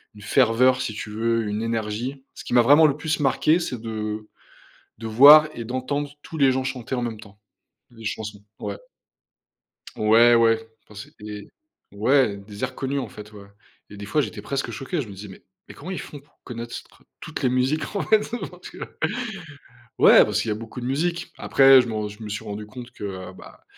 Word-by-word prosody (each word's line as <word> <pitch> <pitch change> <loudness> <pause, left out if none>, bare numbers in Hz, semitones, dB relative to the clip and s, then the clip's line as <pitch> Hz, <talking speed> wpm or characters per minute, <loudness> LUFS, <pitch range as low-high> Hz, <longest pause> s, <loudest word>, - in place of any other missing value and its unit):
une 105 - -13
ferveur, 125 +4 +3
si 110 - -3
tu 105 0 -7
veux, 115 +1 0
une 105 +1 -3
énergie. 115 +4 -3
Ce - - -9
qui - - -5
m'a 120 - +7
vraiment 145 +5 +7
le 145 0 -1
plus 155 0 -2
marqué, 155 +5 +3
c'est 125 -8 -4
de 110 -1 -5 0.7
de 115 - -5
voir 145 +7 +8
et 115 - -6
d'entendre 140 +4 -3
tous 160 - -8
les 135 -2 +4
gens 130 0 -1
chanter 130 -1 -4
en 125 - -2
même 115 -3 -4
temps, 100 -1 -15 0.5
les 115 -2 -13
chansons. 105 -1 -5 0.2
Ouais. - - -5 1.2
Ouais, 115 +3 +5
ouais, 115 -1 +3 0.2
Enfin 105 - -15
c'était 105 -1 -10 0.5
ouais, 110 0 +2
des 100 +3 -7
airs 130 0 -5
connus 135 +1 -3
en - - -5
fait, 105 0 -12
ouais. 100 -1 -12 0.4
Et 105 - -11
des 100 0 -8
fois, 150 +8 +1
j'étais - - -6
presque 135 -3 -3
choqué. 135 +9 -3
Je 115 - -6
me - - -9
disais: 100 +1 -9
«Mais 95 - -13 0.3
mais - - -11
comment 175 +6 -9
ils - - -4
font 145 - -9
pour 145 - -30
connaître 120 -1 -7
ce - - -6
tr - - -24 0.2
toutes - - -7
les - - +4
musiques, 130 +9 0
en - - 0
fait. 215 -1 +2 0.2
Parce - - -12
que?». - - -13 1.2
Ouais, - - +8
parce - - -1
qu'il 115 - -6
y - - +1
a - - -1
beaucoup 115 +3 -8
de 120 - -5
musique. 170 +6 -2
Après, 135 -1 +6
je - - -7
me 110 - -4
r 105 -1 -2
je 105 +2 -13
me 105 - -6
suis 105 +2 -5
rendu 105 0 -6
compte 125 +2 -10
que, 105 - -9
heu, 95 -2 -6
bah, - - -15
115 Hz, 215 wpm, -23 LUFS, 105-135 Hz, 1.2 s, voir